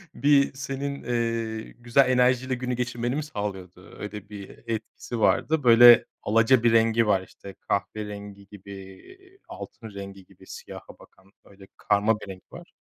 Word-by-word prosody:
Bir 140 -1 +3
senin, 140 +1 -5
eee, 115 -2 -2
güzel 120 +3 +3
enerjiyle 125 +1 +2
günü 125 0 -3
geçirmeni 120 0 -2
mi 150 - -2
sağlıyordu? 95 - -7
Öyle 105 -1 -8
bir 100 -2 -9 0.2
etkisi 115 +1 -5
vardı. 155 +7 +2
Böyle 120 0 +8 0.2
alaca 115 +3 +3
bir 120 - +4
rengi 115 0 +3
var, 95 -3 +2
işte, 95 +1 -13
kahverengi 100 -1 -4
gibi, 100 -1 -13
eee, 370 - -13
altın 120 - -10
rengi 100 -1 -9
gibi - - -20
siyaha - - -11
bakan 95 +1 -21
öyle 95 -1 -17
karma 105 +1 +1
bir - - -10
renk 95 -1 -10
var. - - -12
115 Hz, 150 wpm, -25 LUFS, 100-125 Hz, 0.2 s, Böyle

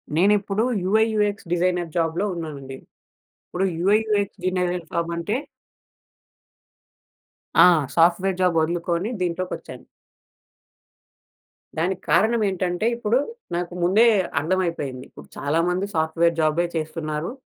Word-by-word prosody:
నేనిప్పుడూ 200 +3 +2 0.2
UI UX 210 -1 +1
designer 175 -1 0
జాబ్‌లో 170 +4 0
ఉన్నానండి. 140 -5 -7 0.7
ఇప్పుడు 190 +2 -2
యూఐయూఎక్స్ 205 +1 +1
డిజైనర్ 180 -2 -1
ఫార్మంటే 170 +4 -2 2.3
ఆ! - - +8 0.3
Software 180 +3 +3
job 180 -3 +2
ఒదులుకోని 170 +4 -1
దీంట్లోకొచ్చాను. 180 +1 -4 1.9
దానికి 185 +3 -1
కారణమేంటంటే, 195 -1 +1
ఇప్పుడు 235 +2 +1 0.4
నాకు 175 0 -3
ముందే 210 +7 +5 0.3
అర్థమైపోయింది. 165 -7 -2
ఇప్పుడు - - -14
చాలామంది 175 +6 0
సాఫ్ట్‌వేర్ 165 +1 +1
జాబే 165 +3 +1
చేస్తున్నారు. 155 +4 -4
175 Hz, 85 wpm, -23 LUFS, 165-195 Hz, 2.3 s, ఆ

